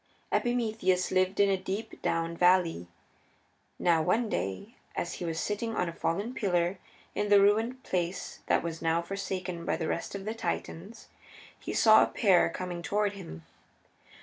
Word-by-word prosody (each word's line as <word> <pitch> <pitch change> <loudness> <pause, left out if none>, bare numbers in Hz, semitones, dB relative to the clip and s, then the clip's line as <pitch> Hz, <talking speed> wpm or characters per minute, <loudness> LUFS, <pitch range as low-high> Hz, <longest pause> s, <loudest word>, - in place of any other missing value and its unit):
Epimetheus 220 -7 +1
lived 185 +1 +1
in 200 - +6
a 195 -1 +2
deep 200 +4 -5
down 165 0 -1
valley. 175 - +3 0.9
Now 170 -2 +3
one 215 +8 +1
day, 95 - -3 0.2
as 175 - -2
he - - -2
was 165 -1 -2
sitting 220 +4 -2
on 180 - 0
a 170 - -4
fallen 200 +9 -2
pillar 180 -4 0 0.3
in 205 - -1
the 205 -1 +7
ruined 225 +6 +2
place 180 0 -3
that - - +2
was 165 -1 -5
now 165 +1 +1
forsaken 185 -2 -4
by - - -1
the 160 - -3
rest - - -3
of 195 0 -6
the 215 - -2
Titans, 220 -1 -5 0.5
he - - -5
saw 220 -1 +7
a - - +4
pair 190 -5 +3
coming 180 -2 -5
toward 205 +3 0
him. 165 - -9
185 Hz, 165 wpm, -29 LUFS, 170-210 Hz, 0.9 s, the